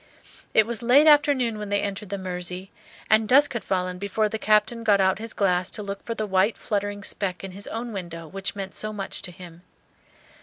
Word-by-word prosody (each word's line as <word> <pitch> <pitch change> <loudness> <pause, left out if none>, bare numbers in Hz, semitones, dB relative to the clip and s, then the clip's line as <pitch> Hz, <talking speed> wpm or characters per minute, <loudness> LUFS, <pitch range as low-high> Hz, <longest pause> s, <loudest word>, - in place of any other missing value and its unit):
It 220 - +6
was 235 +1 -3
late 255 +6 +5
afternoon 285 -7 +4
when 210 -1 -5
they 205 0 +1
entered 200 0 -4
the 200 - -3
Mersey, 180 0 -5 0.4
and 220 0 +4
dusk 285 +2 +5
had 235 - -3
fallen 180 -1 -2
before 200 +2 0
the 220 - -4
Captain 215 +2 +2
got 205 -3 +4
out 190 +1 +2
his 225 +1 -4
glass 180 -2 +1
to 210 - -5
look 200 0 -6
for 230 - -4
the 215 - -2
white 190 +2 +2
fluttering 205 -1 -3
speck 185 -3 -3
in 195 - -6
his 200 +2 -8
own 230 +1 -5
window 170 -4 -6
which 195 +5 -4
meant 195 -1 -6
so 215 - -2
much 200 -2 -5
to - - -5
him. 175 -2 -12
205 Hz, 215 wpm, -25 LUFS, 190-220 Hz, 0.4 s, It